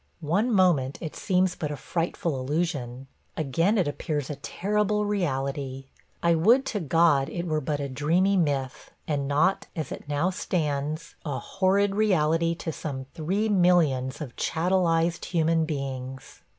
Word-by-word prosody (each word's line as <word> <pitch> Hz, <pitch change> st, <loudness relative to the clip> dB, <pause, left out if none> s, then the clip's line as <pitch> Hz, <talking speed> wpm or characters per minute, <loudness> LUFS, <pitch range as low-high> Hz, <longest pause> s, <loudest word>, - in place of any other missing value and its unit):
One 200 Hz, +11 st, +1 dB
moment 170 Hz, -, +3 dB
it 160 Hz, -, -6 dB
seems 185 Hz, -1 st, +1 dB
but 150 Hz, -, -3 dB
a 150 Hz, -, -3 dB
frightful 165 Hz, -1 st, -2 dB
illusion; 135 Hz, -3 st, -2 dB, 0.3 s
again 165 Hz, -, +1 dB
it 185 Hz, -, +2 dB
appears 145 Hz, -1 st, -3 dB
a -, -, -4 dB
terrible 210 Hz, +7 st, 0 dB
reality. 135 Hz, -8 st, -2 dB, 0.3 s
I 170 Hz, 0 st, +4 dB
would 230 Hz, +12 st, +4 dB
to 210 Hz, -, 0 dB
God 160 Hz, -3 st, +3 dB
it 170 Hz, 0 st, -4 dB
were 155 Hz, -2 st, 0 dB
but 145 Hz, +1 st, -2 dB
a 140 Hz, -, -2 dB
dreamy 165 Hz, +9 st, +2 dB
myth, 140 Hz, -7 st, -1 dB, 0.2 s
and 140 Hz, -3 st, -1 dB
not, 155 Hz, +7 st, +2 dB
as 160 Hz, -, -4 dB
it -, -, -7 dB
now 150 Hz, +6 st, +1 dB
stands, 155 Hz, -4 st, -2 dB
a 145 Hz, -4 st, -3 dB
horrid 195 Hz, +1 st, +1 dB
reality 170 Hz, -5 st, +2 dB
to 165 Hz, -, -4 dB
some 135 Hz, -4 st, -5 dB
three 190 Hz, +7 st, -1 dB
millions 170 Hz, -10 st, +2 dB
of 130 Hz, -6 st, -7 dB
chattelized 170 Hz, -1 st, +1 dB
human 165 Hz, -2 st, +1 dB
beings. 135 Hz, -3 st, -5 dB
160 Hz, 150 wpm, -26 LUFS, 140-180 Hz, 0.3 s, I